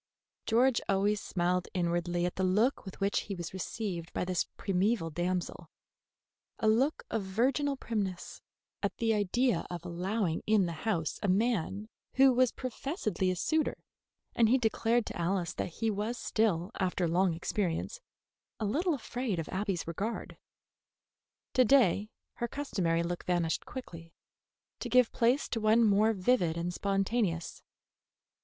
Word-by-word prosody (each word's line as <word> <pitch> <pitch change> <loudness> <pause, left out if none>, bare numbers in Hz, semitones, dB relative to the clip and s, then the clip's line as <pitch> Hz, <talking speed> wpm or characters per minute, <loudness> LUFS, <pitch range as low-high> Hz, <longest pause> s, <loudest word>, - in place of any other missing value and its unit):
George 240 +2 +3
always 200 +1 +2
smiled 180 0 0
inwardly 175 0 0
at 180 - -1
the 190 - -1
look 210 +9 +2
with 190 - -9
which 200 +1 +1
he 200 - -2
was 175 -1 -6
received 185 -3 -4
by - - -1
this 180 -1 0
primeval 195 -2 0
damsel, 175 +2 -3 0.9
a 220 - 0
look 255 +8 +2
of 225 - 0
virginal 260 +9 0
primness 200 -8 -4 0.4
at - - -2
the 225 -1 +2
idea 210 +1 +1
of 175 -1 -6
allowing 180 0 -1
in 215 -3 +4
the 170 - -2 0.2
house 165 -7 -1
a - - 0
man 205 0 +1 0.3
who 265 0 +6
was 250 -1 +3
professedly 250 - -2
a 185 - 0
suitor, 315 - 0 0.6
and 230 -2 +4
he 255 - +5
declared 230 -1 +1
to - - -6
Alice 175 0 -1
that - - -3
he 220 +6 -1
was 215 +4 -2
still, 195 -8 0
after 185 -2 0
long 175 +1 +2
experience, 180 - -2 0.6
a 220 - -1
little 315 - +1
afraid 245 -5 -3
of 165 - -3
Abby's 190 -2 -2
regard. 200 +8 -4 1.2
To 255 - +5
day 215 -5 +4 0.3
her 235 - -1
customary 180 -13 -1
look 175 +1 -3
vanished 175 -2 0
quickly, 165 -10 -9 0.6
to - - -4
give 250 -2 +4
place 240 +4 +2
to 225 - -2
one 220 +2 +5
more 215 +1 +4
vivid 185 -5 +1
and 175 +1 -2
spontaneous. 195 -3 -1
200 Hz, 150 wpm, -31 LUFS, 175-230 Hz, 1.2 s, who